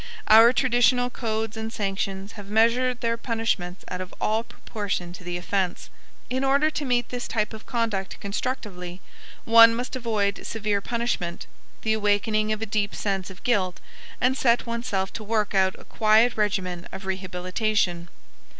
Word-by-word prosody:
Our 225 +2 +9
traditional 245 -1 +3
codes 220 -2 -3
and 220 0 -4
sanctions 195 -1 -3
have 205 -2 -10
measured 235 +3 +2
their 230 0 0
punishments 225 -7 -2
out 180 - -4
of 185 - -8
all 220 +1 +1
proportion 200 -7 -5
to 180 - -11
the 175 0 -3
offense. 185 0 -2 0.4
In 260 +2 -1
order 280 +3 +3
to 300 -1 -3
meet 245 -2 +1
this 245 -1 -4
type 215 -2 -1
of 220 - -10
conduct 225 -5 -2
constructively, 200 -4 -4 0.5
one 230 0 +8
must 250 +3 -4
avoid 215 -5 -1
severe 210 -2 -1
punishment, 230 -7 -2 0.4
the 220 - +2
awakening 215 0 +1
of 215 0 -1
a - - -1
deep 205 -1 -1
sense 195 -2 -2
of 190 0 -13
guilt, 190 -7 +1 0.4
and 255 +1 +2
set 240 -3 +2
oneself 230 -5 -2
to 220 - -6
work 215 -1 0
out 190 -1 +3
a - - -15
quiet 220 +2 +3
regimen 185 -4 -1
of 190 - -8
rehabilitation. 185 -1 -1
215 Hz, 160 wpm, -25 LUFS, 195-235 Hz, 0.5 s, Our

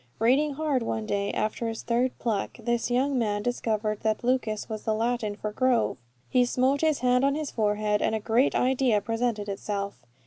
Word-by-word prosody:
Reading 275 +6 +2
hard 295 -4 0
one 220 -1 -2
day, 200 -1 -1
after 220 +2 -2
his 225 0 -4
third 245 +2 0
pluck, 215 -4 -2
this 235 +1 -1
young 260 +2 +1
man 205 -2 0
discovered 215 -3 -1
that 220 +1 -1
lucus 235 -4 0
was 215 -2 -5
the 220 - 0
Latin 225 -2 -1
for 210 0 -4
grove. 250 - +1 0.3
He 250 - +3
smote 255 +3 +1
his 310 -2 +2
hand 250 +1 +3
on 275 +1 +3
his 305 -2 -3
forehead, 210 -1 0
and 220 - +1
a - - -1
great 230 +5 +2
idea 255 -3 +2
presented 225 0 -2
itself. 200 -1 -4
230 Hz, 185 wpm, -27 LUFS, 215-255 Hz, 0.3 s, He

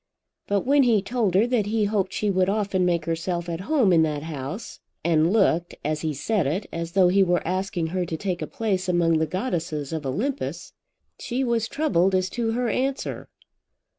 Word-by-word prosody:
But 200 -1 +1
when 280 +5 +4
he 235 -5 +4
told 215 -3 0
her 205 +4 +5
that 240 -4 0
he 215 0 +1
hoped 200 -2 0
she 205 +2 0
would 185 0 +2
often 200 -3 0
make 170 -3 0
herself 170 +1 -2
at 165 -1 -3
home 255 - +4
in 165 - +5
that 150 -2 0
house, 155 - -6 0.2
and 165 0 +3
looked, 175 -5 +2
as 155 0 -1
he 160 - -1
said 155 +4 0
it, 185 +8 -1
as 170 0 -4
though 185 -2 +5
he 195 +2 +4
were 175 -3 +1
asking 185 -1 -1
her 185 -1 0
to 160 - -3
take 180 -1 -3
a - - -3
place 205 -8 -2
among 170 -2 +3
the 160 - +1
goddesses 165 - -3
of 160 -2 -3
Olympus, 225 - -3 0.5
she 260 +2 -2
was 235 -3 0
troubled 195 - +1
as 185 0 0
to 230 -2 -1
her 245 +1 0
answer. 265 +4 -2
185 Hz, 195 wpm, -24 LUFS, 165-220 Hz, 0.5 s, her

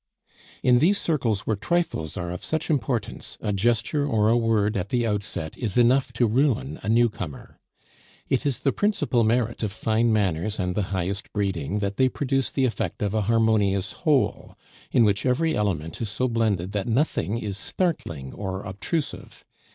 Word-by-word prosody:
In 125 -1 +5
these 190 +8 +4
circles 120 - 0
where 110 - -1
trifles 105 - -1
are 90 -1 -3
of 90 - -6
such 160 +1 -1
importance, 125 -7 -2
a 105 - -2
gesture 120 +8 +1
or 110 -7 +2
a 115 - +4
word 110 -3 +2
at 95 0 -2
the 120 -2 +1
outset 100 -7 -3
is 110 -4 -2
enough 125 +2 +4
to 120 +1 +2
ruin 115 - +1
a 100 - -4
newcomer. 110 - 0 0.7
It 135 - +1
is 140 -4 -1
the 135 - +2
principal 200 - +1
merit 115 +1 +1
of 110 -3 -1
fine 110 +2 +1
manners 100 -1 0
and 90 -1 0
the 105 - 0
highest 95 +1 -3
breeding 95 -4 -1
that 100 -1 -2
they 130 0 +4
produce 135 -1 -1
the 135 - +1
effect 110 -5 -2
of 100 -1 -1
a 110 - +1
harmonious 105 -4 +2
whole, 145 -4 0 0.3
in 120 - +5
which 100 -1 +1
every 155 +6 +1
element 85 -6 -2
is 110 - -2
so 130 +5 0
blended 110 -6 0
that 100 -2 -2
nothing 115 - 0
is 105 -4 -4
startling 85 - -2
or 95 -1 -4
obtrusive. 110 - -4
110 Hz, 175 wpm, -25 LUFS, 100-125 Hz, 0.7 s, In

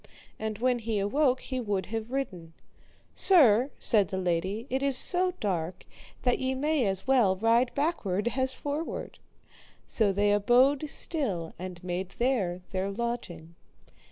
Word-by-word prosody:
And 220 -1 -3
when 250 +2 +1
he 225 -1 -2
awoke 255 +6 +1
he 260 -1 -4
would 205 -5 -2
have 225 0 -3
ridden. 185 -12 -4 0.6
Sir, 260 - +5
said 210 -5 +3
the 190 - -4
lady, 185 +5 -1
it 265 +1 0
is 275 -2 +3
so 365 +3 +1
dark 180 -4 -3 0.4
that 245 -1 +2
ye 260 0 -1
may 290 -3 +1
as 190 -1 -1
well 245 -8 +3
ride 230 +5 +3
backward 240 - -1
as 260 0 0
forward. 290 +4 -5 0.7
So 215 -3 +1
they 205 +1 +2
abode 255 +8 +3
still 205 - -2
and 180 -1 -7
made 180 +1 -4
there 205 -8 0
their 190 0 -2
lodging. 195 -7 -5
225 Hz, 145 wpm, -28 LUFS, 190-265 Hz, 0.7 s, Sir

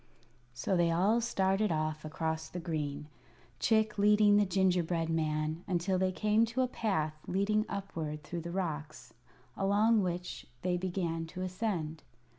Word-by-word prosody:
So 155 +10 0
they 170 -1 +3
all 195 +8 +3
started 195 -2 +1
off 155 -1 -1
across 160 +1 -3
the 180 - -5
green, 150 -3 -3 0.5
Chick 220 -2 +2
leading 210 0 +5
the 205 -1 +3
gingerbread 175 -3 +1
man, 155 +1 -1
until 185 0 0
they 185 0 +2
came 215 +3 +2
to 230 +3 -1
a - - +1
path 190 -11 -1
leading 210 +3 +1
upward 160 -6 -4
through 175 -1 -5
the 170 - -6
rocks, 160 -5 -4 0.4
along 210 +3 +3
which 180 -1 -4 0.2
they 180 -1 +1
began 175 -3 -2
to 185 +3 -6
ascend. 180 -5 -2
180 Hz, 145 wpm, -32 LUFS, 160-200 Hz, 0.5 s, leading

